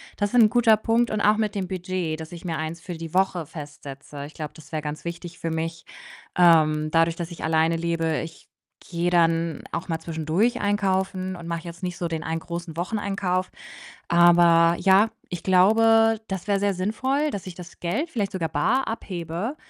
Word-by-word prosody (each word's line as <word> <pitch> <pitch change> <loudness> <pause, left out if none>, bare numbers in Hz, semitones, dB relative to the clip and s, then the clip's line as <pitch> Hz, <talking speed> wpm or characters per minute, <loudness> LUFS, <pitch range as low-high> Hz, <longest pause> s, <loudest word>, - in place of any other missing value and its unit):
Das 205 0 -1
ist - - 0
'n 220 -2 +7
guter 230 -2 +4
Punkt 230 +2 +1
und 215 - -1
auch 210 +1 +4
mit 215 -1 -1
dem 190 -2 -2
Budget, 180 -3 -3
dass 160 +1 -8
ich 175 0 -10
mir 165 -2 -2
eins 160 +2 -4
für 180 - -7
die 165 -1 -8
Woche 185 -4 +1
festsetze. 145 -2 -9
Ich 150 - -13
glaube, 150 -2 -5
das 160 - -15
wäre 155 -2 -3
ganz 150 +2 -6
wichtig 170 0 -7
für 165 - -3
mich, 165 +1 -4 0.5
ähm, 155 -3 +4
dadurch, 165 0 +3
dass 170 0 -5
ich 170 - -8
alleine 160 +1 +2
lebe. 165 -1 -1
Ich 165 - -11 0.4
gehe 170 0 0
dann 165 -1 +1
auch 175 - -4
mal 165 -2 -1
zwischendurch 160 +8 0
einkaufen 190 -2 0
und 170 -1 -9
mache 170 -1 -3
jetzt 170 -1 -9
nicht 180 -1 -4
so 175 - -2
den 160 -1 -4
einen 165 0 -2
großen 170 -1 -7
Wocheneinkauf. 185 -1 -1 0.6
Aber 170 -1 +5
ja, 195 +3 +5 0.2
ich 175 -3 -5
glaube, 225 +4 +4
das 190 -1 -4
wäre 200 -2 +1
sehr 200 -1 +1
sinnvoll, 260 +10 0
dass 200 -8 -6
ich 185 - -7
das 175 -1 -12
Geld 285 - -2
vielleicht 205 -9 -2
sogar 170 -5 -2
bar 235 - +1
abhebe, 185 - -4
175 Hz, 195 wpm, -24 LUFS, 165-200 Hz, 0.6 s, n